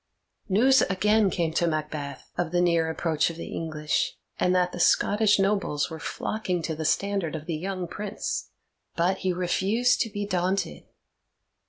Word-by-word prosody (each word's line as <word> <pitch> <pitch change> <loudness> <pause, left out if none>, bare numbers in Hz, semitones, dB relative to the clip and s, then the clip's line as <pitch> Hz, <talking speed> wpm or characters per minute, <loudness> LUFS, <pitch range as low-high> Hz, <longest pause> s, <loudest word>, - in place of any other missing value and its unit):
News 255 +7 +5
again 210 +2 +3
came 165 -3 -1
to 170 +1 +2
Macbeth 150 -3 -4
of 170 -2 -1
the 175 - +2
near 170 -2 +2
approach 160 -1 0
of 165 - -7
the - - -7
English, 155 -3 -1 0.2
and 180 0 +2
that 180 -1 +2
the 175 - -7
Scottish 210 +4 +4
nobles 195 -7 0
were 160 - -6
flocking 180 -4 -3
to 160 - -2
the 160 0 -4
standard 195 -2 0
of 155 -1 -6
the 165 - -3
young 185 +3 -3
Prince. 210 +4 -4 0.5
But 180 +3 +1
he 185 - 0
refused 195 +7 +1
to 225 - 0
be 205 -1 -3
daunted. 185 0 -1
180 Hz, 165 wpm, -26 LUFS, 160-200 Hz, 0.5 s, News